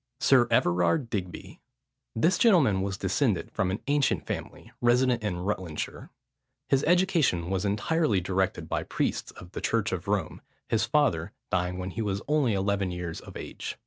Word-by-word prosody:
SIR 125 -3 +5
EVERARD 90 - +2
DIGBY. 90 -4 -5 0.6
This 170 +10 +2
gentleman 160 - +4
was 95 0 -2
descended - - 0
from 95 - 0
an 95 +4 -3
ancient 145 0 +1
family, - - -6
resident 120 0 +3
in 105 -4 -2
Rutlandshire. 90 -5 -4 0.6
His 135 +1 +3
education 165 - +2
was 95 +1 0
entirely 105 - +1
directed 95 -2 -1
by - - -1
priests - - -2
of 90 - -12
the - - -6
church 115 -1 0
of 90 0 -4
Rome, 100 -5 -1 0.3
his - - +1
father - - +1 0.2
dying 90 0 0
when 95 0 -4
he 115 - -4
was 100 -2 -2
only 145 -7 +2
eleven 100 0 0
years 90 -2 -5
of - - -10
age. - - -6
100 Hz, 160 wpm, -27 LUFS, 90-130 Hz, 0.6 s, SIR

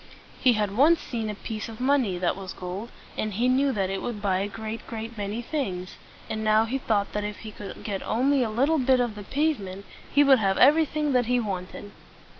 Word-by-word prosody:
He 250 - +5
had 210 -2 -1
once 305 +7 +5
seen 225 -3 -4
a 210 - -4
piece 220 +1 -5
of 220 - -9
money 255 -8 +2
that 175 0 0
was 190 -1 -7
gold, 185 +5 -6 0.3
and 215 -1 -2
he 240 +4 +2
knew 270 +2 +3
that 195 -5 -1
it 195 - -3
would 235 -4 -4
buy 195 -2 +1
a 200 - -1
great, 220 +2 -6
great 225 +1 -6
many 210 +3 -4
things; 195 - -3 0.3
and 220 0 -3
now 215 +1 +4
he 260 +4 -2
thought 210 -5 0
that 210 - -1
if 210 0 -5
he 220 - -7
could 205 -1 -9
get 200 -3 -3
only 270 +4 +2
a 235 - +1
little 275 +8 +2
bit 260 0 +3
of 240 -3 0
the 210 - -8
pave 295 +7 0
ment, 195 0 -8 0.3
he 285 - +5
would 270 -3 +6
have 195 -2 +1
everything 300 0 +4
that 245 -2 +2
he 250 0 +2
wanted. 200 -1 -5
220 Hz, 225 wpm, -26 LUFS, 200-255 Hz, 0.3 s, would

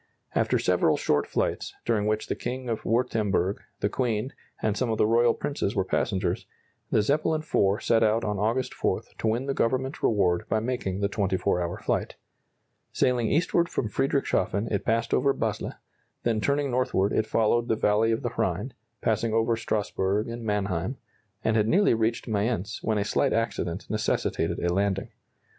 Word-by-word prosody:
After - - +2
several - - +2
short - - +1
flights, - - -2
during 105 -2 +1
which 110 0 0
the - - -2
King 125 +1 -4
of 115 - -2
Württemberg, 105 -5 +1 0.2
the - - +2
Queen, 120 +1 -1 0.3
and 110 -2 0
some 125 +2 -1
of 110 - 0
the - - +4
royal 115 +1 +4
princes 140 -8 -2
were 95 -2 +1
passengers, 95 -4 -1 0.4
the 105 - +3
Zeppelin 155 +5 +1
IV 100 -9 +1
set 115 - +3
out 110 +1 +3
on 105 -2 -1
August 115 +5 0
4 - - -1 0.2
to - - 0
win 115 +4 0
the 135 - -1
Government 130 +3 0
reward 90 -5 +2
by 110 - +2
making 110 -5 -2
the 100 - +2
24 95 -3 0
hour 85 -1 -3
flight. - - -2 0.8
Sailing 125 -3 +1
eastward 170 +2 +2
from 110 - -2
Friedrichshafen 115 -3 0
it 100 - -1
passed 115 +1 +1
over 140 -1 +3
Basle, - - -2 0.5
then 115 -2 +1
turning 140 +2 +1
northward 120 -6 +1
it 110 - +1
followed 115 +2 +2
the 110 - +2
valley 110 +1 +2
of 115 - -1
the - - -2
Rhine, - - -1 0.3
passing 115 -2 0
over 115 +1 +2
Strasburg 105 -2 -1
and 115 0 -6
Mannheim, 105 +1 -1 0.5
and 110 - +2
had 110 -1 +3
nearly 200 - +4
reached 115 +1 0
Mayence 105 -2 -1
when 110 -1 0
a 100 - +1
slight - - +1
accident 105 -5 -2
necessitated 110 0 -1
a 85 0 0
landing. 100 0 0
110 Hz, 175 wpm, -27 LUFS, 100-120 Hz, 0.8 s, the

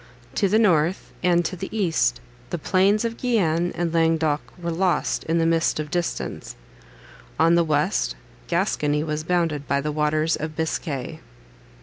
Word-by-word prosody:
To 200 - +1
the 215 - +3
north, 180 -5 +2
and 175 -1 +3
to 185 - -2
the 190 +2 -6
east, 195 -7 +1 0.3
the 175 - -2
plains 195 +6 +2
of 230 0 -3
Guienne 175 -9 +1
and 170 -1 -1
Languedoc 160 -2 +2 0.2
were 170 -1 -3
lost 180 +2 0
in 165 +1 +1
the 165 - +2
mist 165 -1 +2
of 150 -1 -4
distance; 175 -1 -3 0.8
on 165 +1 +5
the 170 0 +4
west, 145 - 0 0.3
Gascony 150 0 0
was 155 -1 -3
bounded 165 -4 0
by 140 - +1
the 150 +2 -2
waters 155 +1 +1
of 155 +1 -5
Biscay. 160 -2 -3
165 Hz, 155 wpm, -23 LUFS, 155-180 Hz, 0.8 s, on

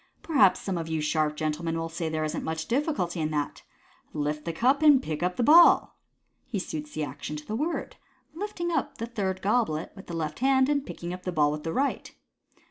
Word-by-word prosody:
Perhaps 280 - +4
some 185 -3 -3
of 165 - -4
you 160 -1 -1
sharp 150 0 0
gentlemen 155 +2 -2
will 165 0 -2
say 165 0 -3
there 155 0 -2
isn't 155 - -3
viuch 160 0 -3
difficulty 240 - -1
in 155 - 0
that. 150 -2 -3 0.5
Lift 150 0 -2
the 170 - -1
cup, 255 - +2
and 295 -3 +7
pick 155 -11 -4
up 180 +1 0
the 245 - 0
ball! 335 +6 +6 0.3
" - - -47
He 215 - -1
suits 155 -5 -5
the 155 - -1
action 145 +2 -6
to 150 0 -8
the 215 - -4
word, 315 +7 -3 0.4
lifting 345 -1 -3
up 315 -5 -2
the 230 - -3
third 195 -5 -3
goblet 200 -7 0
with 195 - -12
the 170 - -5
left 155 -2 -3
hand, 265 +1 +3
and 285 -2 +1
picking 175 +1 -6
up 180 - -7
the 180 - -3
ball 150 -3 +3
with 150 0 -4
the 165 - -3
right. 275 +9 -1
175 Hz, 220 wpm, -27 LUFS, 155-260 Hz, 0.5 s, and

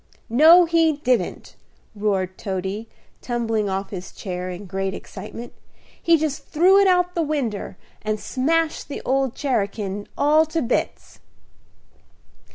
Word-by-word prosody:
"No, 325 +8 +8
he 330 -1 +3
didn't," 255 -4 -1 0.4
roared 195 -3 -1
Toady, 195 +4 -4 0.3
tumbling 225 -4 -1
off 195 +1 -3
his 185 -2 -7
chair 180 -1 -5
in 180 +3 -7
great 195 +1 -3
excitement. 215 +5 -9 0.5
"He 335 -1 +4
just 305 -2 -3
threw 365 +5 +5
it 400 - +5
out 360 -1 +3
a 340 - +1
winder, 260 - -2 0.2
and 215 0 -2
smashed 315 +8 0
the 285 - -6
old 265 -1 +1
cherakin 205 -6 -2
all 305 +2 +4
to 320 0 -1
bits." 240 - -2
240 Hz, 130 wpm, -22 LUFS, 200-310 Hz, 0.5 s, No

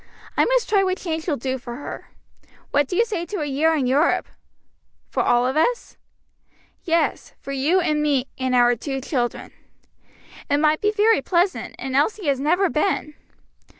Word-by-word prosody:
I - - +3
must - - +1
try 405 -3 +3
what 370 -1 0
change 320 -2 -4
will 300 -4 0
do 260 +2 -3
for 240 0 -8
her. 285 - -8 0.6
What 290 -1 +2
do 360 - -4
you 460 - +3
say 405 -7 -3
to 405 -5 -4
a - - -1
year 300 +3 +1
in 280 -4 0
Europe?" 275 +6 +2 0.8
"For - - 0
all 245 0 +3
of 260 +2 -1
us?" 470 +11 0 0.9
"Yes, 335 0 -1
for 275 - -8
you 285 +7 +2
and 305 -4 0
me 280 -4 +1
and 260 -1 -1
our 245 0 +4
two 270 +3 -4
children." 250 -3 -3 1.0
"It 285 - +3
might 305 +1 +2
be 420 - +2
very 435 +1 +3
pleasant, 360 +1 0
and 265 -1 -4
Elsie 340 +8 +1
has 280 -3 +1
never 350 +7 +2
been." 305 -2 -1
300 Hz, 180 wpm, -22 LUFS, 270-365 Hz, 1.0 s, our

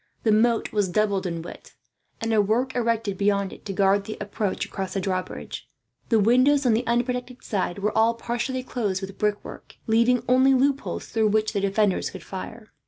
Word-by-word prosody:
The 220 - +3
moat 225 +2 +2
was 205 -3 +1
doubled 200 0 +1
in 170 -2 -4
width, - - -11 0.4
and 225 0 -1
a 215 - +5
work 240 +6 0
erected 225 -5 -1
beyond 200 -1 +1
it, - - -14
to 200 - -4
guard 195 +1 +2
the 215 - -6
approach 205 -1 -2
across 190 -1 -5
the - - +1
drawbridge. 185 -1 -4 0.4
The 230 - +4
windows 255 +6 +4
on 240 - +4
the 230 +2 0
unprotected 245 +1 -1
side 190 -3 -2
were 210 +1 -1
all 225 +1 +3
partially 240 +2 -3
closed 210 -7 -2
with 195 0 -8
brickwork, 210 -1 -3
leaving 235 +2 +3
only 260 +2 +5
loopholes 275 +1 0
through 220 -1 +1
which 215 +1 +1
the 200 - 0
defenders 200 0 +1
could 190 -3 -10
fire. 215 +6 -8
215 Hz, 185 wpm, -25 LUFS, 200-240 Hz, 0.4 s, a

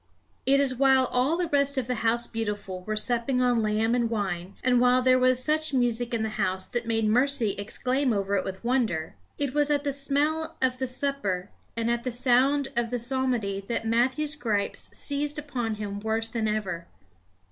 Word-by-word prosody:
It 275 +1 +5
was 275 -2 +2
while 265 0 +4
all 260 +7 +2
the 355 -1 0
rest 280 -1 +2
of 260 - 0
the 250 - -1
House 235 +1 +2
Beautiful 205 -5 -4
were 215 - -2
supping 240 +3 +1
on 245 -2 +3
lamb 215 +2 +1
and 240 -2 +1
wine, 195 -4 -3
and 250 -1 +4
while 250 0 +5
there 255 0 +5
was 255 0 +3
such 310 -1 0
music 245 -1 +1
in 230 -2 0
the 220 0 -4
House 185 -1 0
that 240 -1 -3
made 225 -1 +1
Mercy 245 0 +2
exclaim 250 +7 -1
over 200 -1 0
it 190 - +1
with 190 +2 -6
wonder 230 -11 0 0.2
it 280 -2 -2
was 295 0 +2
at 290 -1 +1
the 285 -1 -1
smell 295 +3 -1
of 255 -1 0
the 260 - -1
supper 250 -8 -2 0.3
and 230 0 0
at 235 0 -1
the 255 - -1
sound 265 +3 +2
of 235 -1 0
the 245 - -1
psalmody 240 -5 -1
that 230 -1 -2
Matthew's 255 +7 +1
gripes 215 -8 -1
seized 290 +1 -1
upon 250 -7 -3
him 205 -1 -5
worse 220 +1 -1
than 225 -2 -1
ever. 190 -6 -3
245 Hz, 195 wpm, -27 LUFS, 215-270 Hz, 0.3 s, It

